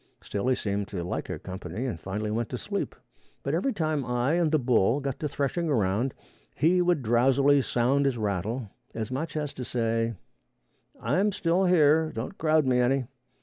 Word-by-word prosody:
Still 100 +4 -3
he 130 - +3
seemed 100 -3 -2
to 90 -5 -4
like 90 - -4
our - - -3
company, 95 +4 -6
and 105 -11 -3
finally 105 +5 -3
went 115 0 -1
to - - -3
sleep; - - -3 0.5
but 140 - -2
every 185 +12 +1
time 155 - -1
I 125 +3 0
and 170 -3 +2
the 155 - +4
bull 120 -2 +2
got 135 -2 -4
to 150 - -2
threshing 145 +4 -1
around, 115 0 +1 0.4
he 175 +5 +3
would 175 -6 +2
drowsily 135 +5 +4
sound 130 +3 +1
his 130 -3 0
rattle, 105 +2 -2 0.2
as 110 +2 -4
much 150 +4 -3
as 150 -2 -3
to 130 - -6
say, 115 -1 -1 0.8
"I 130 +11 0
am 205 +2 +3
still 180 +1 +1
here; 160 -3 +4
don't 115 - -5
crowd 155 -2 +3
me 125 -1 +3
any." 130 +1 +2
130 Hz, 190 wpm, -27 LUFS, 115-155 Hz, 0.8 s, the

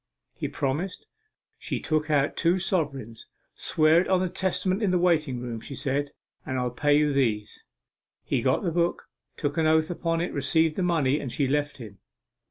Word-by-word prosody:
He - - -4
promised; 150 +7 -3 0.5
she - - -3
took 155 0 -1
out 145 -1 +2
two 170 +2 +2
sovereigns. 140 - -2 0.3
"Swear 155 +2 +3
it - - -3
on 190 -1 +3
the 185 0 0
Testament 190 +2 -1
in 205 - +2
the 180 - +2
waiting 160 -7 +1
room," 120 -2 -5
she 140 - -8
said, 140 +1 -1 0.3
"and 130 -3 -3
I'll 125 -1 -1
pay 145 +4 +2
you 150 -1 +2
these." 110 -6 -1 0.6
He - - 0
got - - +1
the 170 - 0
book, 170 +1 0 0.3
took 145 +1 -2
an 160 - +3
oath 160 +1 +3
upon 165 -1 -1
it, 175 - -2
received 155 +3 +2
the - - -2
money, 155 -6 +2
and 130 - -5
she 140 0 0
left 145 +1 -1
him. 105 -7 -11
150 Hz, 185 wpm, -26 LUFS, 135-170 Hz, 0.6 s, Swear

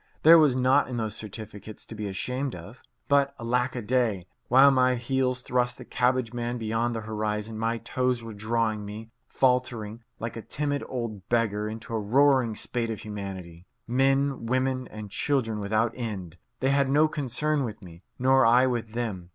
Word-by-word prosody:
There 165 +1 +9
was 145 -5 +4
naught 130 +2 +3
in 125 -1 -4
those 110 -2 -2
certificates 110 0 -8
to - - -9
be 105 -1 -4
ashamed 125 +7 -3
of. 100 +9 -11 0.3
But 140 -1 +3
alack 125 +2 0
a 120 - -4
day! 110 -5 0 0.2
While 135 +3 +7
my 130 -1 +3
heels 130 +1 -1
thrust 125 -1 0
the - - -10
cabbage 125 -1 0
man 120 0 -3
beyond 115 +1 -1
the 115 - -3
horizon, 110 0 -3
my 115 +1 0
toes 125 0 -1
were 115 -1 -7
drawing 110 0 -1
me, 110 +2 -8 0.2
faltering, 120 -4 0 0.2
like 115 +1 -4
a 115 - -5
timid 145 +3 -2
old 115 -6 -5
beggar, 105 -3 +1
into 110 +2 -7
a 110 - 0
roaring 130 +1 +3
spate 115 0 -2
of 110 - -4
humanity 95 -5 -7 0.2
men, 135 0 +1
women, 130 0 0
and 105 -2 -9
children 115 -6 0
without 110 +3 +1
end. 95 -8 -6 0.2
They 135 +1 +2
had 140 -1 +2
no 150 +3 +4
concern 145 +1 -1
with 110 -4 -6
me, 85 -1 -12 0.2
nor 130 +1 +4
I 120 +3 +5
with 120 -3 -2
them. 105 -7 -4
120 Hz, 175 wpm, -27 LUFS, 110-130 Hz, 0.3 s, There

